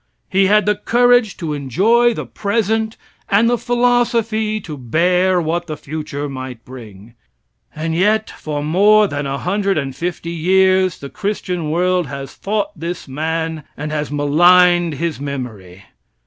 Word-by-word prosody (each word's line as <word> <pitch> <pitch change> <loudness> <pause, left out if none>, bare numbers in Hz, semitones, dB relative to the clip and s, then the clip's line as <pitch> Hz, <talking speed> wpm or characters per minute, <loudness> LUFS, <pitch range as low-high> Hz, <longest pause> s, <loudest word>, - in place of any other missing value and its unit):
He 195 0 +3
had 210 +1 +4
the 210 - +3
courage 245 +1 +2
to 160 -3 -4
enjoy 220 - +2
the - - -5
present 220 +1 -1 0.3
and 210 +3 +4
the 245 - +3
philosophy 235 -3 +1
to 155 -5 -7
bear 180 +8 +1
what 170 +1 -2
the 155 - -5
future 145 -1 -5
might 130 -4 -8
bring. 115 -4 -12 0.6
And 160 +1 -3
yet 210 +5 +2
for 145 -1 -5
more 205 +7 +4
than 145 -4 -4
a 135 0 -2
hundred 195 +3 -1
and 135 -3 -3
fifty 170 +2 -4
years 185 +2 +2
the 140 - -9
Christian 185 -6 -3
world 180 +1 +1
has 135 -1 -7
fought 205 0 -2
this 170 +2 -6
man 160 +3 -3
and 150 +1 -5
has 150 -1 -2
maligned 175 +3 +4
his 165 +1 -3
memory. 110 -10 -7
175 Hz, 150 wpm, -18 LUFS, 145-205 Hz, 0.6 s, had